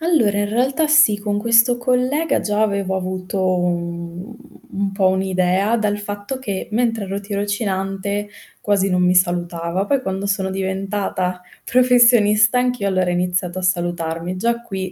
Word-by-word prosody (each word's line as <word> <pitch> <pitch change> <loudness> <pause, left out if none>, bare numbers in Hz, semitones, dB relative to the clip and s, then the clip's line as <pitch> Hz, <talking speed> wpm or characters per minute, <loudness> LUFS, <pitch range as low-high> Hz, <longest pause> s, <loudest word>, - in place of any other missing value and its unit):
Allora 300 -12 +2
in 205 - -1
realtà 265 +8 +1
sì, 295 -8 +5
con 205 0 -2
questo 230 +3 +4
collega 255 +6 0
già 210 0 -1
avevo 200 -3 0
avuto 185 +1 -3
un 170 +2 -4 0.4
un 195 0 -1
po' 195 -1 +2
un'idea 190 +3 +1
dal 210 -2 -1
fatto 205 +5 -6
che, 200 -7 -4
mentre 225 -1 0
ero 195 +1 -4
tirocinante 200 0 -3 0.3
quasi 195 -1 +1
non 180 -1 +1
mi 180 0 +3
salutava, 175 0 0
poi 275 +4 +1
quando 190 -3 -3
sono 195 -1 -1
diventata 190 -1 -3 0.2
professionista 240 -3 +4
anch'io 250 -4 0
allora 185 -1 +1
ha - - -1
iniziato 180 0 -1
a - - -6
salutarmi. 175 -1 -2
Già 235 +5 -1
qui, 190 -4 -5
200 Hz, 150 wpm, -19 LUFS, 185-225 Hz, 0.4 s, sì